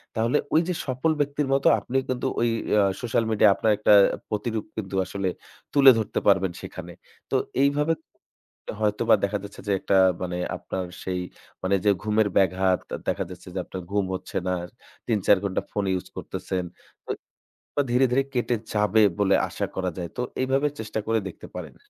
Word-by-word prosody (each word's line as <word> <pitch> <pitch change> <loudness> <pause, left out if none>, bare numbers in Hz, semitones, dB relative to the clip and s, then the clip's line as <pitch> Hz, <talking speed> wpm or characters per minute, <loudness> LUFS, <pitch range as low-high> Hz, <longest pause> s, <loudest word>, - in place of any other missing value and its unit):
তাহলে 115 +5 +2 0.2
ওই 160 - +6
যে 180 - 0
সফল 130 +4 0
ব্যক্তির 145 0 0
মতো 135 - +3
আপনি 125 +6 -2
কিন্তু 130 +1 -1
ওই 120 - +3 0.3
আ - - +6 0.2
social 115 -1 +1
media 105 0 +5
আপনার 110 +2 +2
একটা 105 0 +4 0.4
প্রতিরূপ 110 +1 -2
কিন্তু 95 -3 -4
আসলে 95 0 -2 0.4
তুলে 140 -2 +9
ধরতে 110 - -1
পারবেন 95 -2 +4
সেখানে। - - -8 0.4
তো - - +1 0.3
এইভাবে 150 +3 +2 0.9
হয়তোবা 105 -1 +3
দেখা 100 +1 +1
যাচ্ছে 100 +1 -10
যে - - +1
একটা 95 - +2 0.2
মানে 90 -1 -3 0.2
আপনার 95 -1 -4 0.2
সেই 90 -1 -2 0.4
মানে 95 +1 +2
যে 105 - +6
ঘুমের 105 0 +2
ব্যাঘাত, 95 -1 +3 0.3
দেখা - - 0
যাচ্ছে 90 0 -11
যে - - -1
আপনার 95 - -6
ঘুম 100 -1 +1
হচ্ছে 95 - -9
না, 90 - +1 0.5
৩-৪ 105 -3 +4
ঘণ্টা 95 -2 -1
phone 100 -1 -1
use - - -9
করতেছেন। 90 -1 -4 0.4
তো - - -7 0.6
ধীরে, 125 +2 +4
ধীরে 135 +2 +3
কেটে 120 -1 +1 0.2
যাবে 105 +1 +3 0.2
বলে 100 - +4
আশা - - -2
করা 95 -1 -1
যায়। 85 -2 -4
তো - - 0 0.2
এইভাবে 135 +3 +2
চেষ্টা 110 0 -3
করে 115 0 +2
দেখতে - - -11
পারেন। - - -7
105 Hz, 170 wpm, -25 LUFS, 95-125 Hz, 0.9 s, তুলে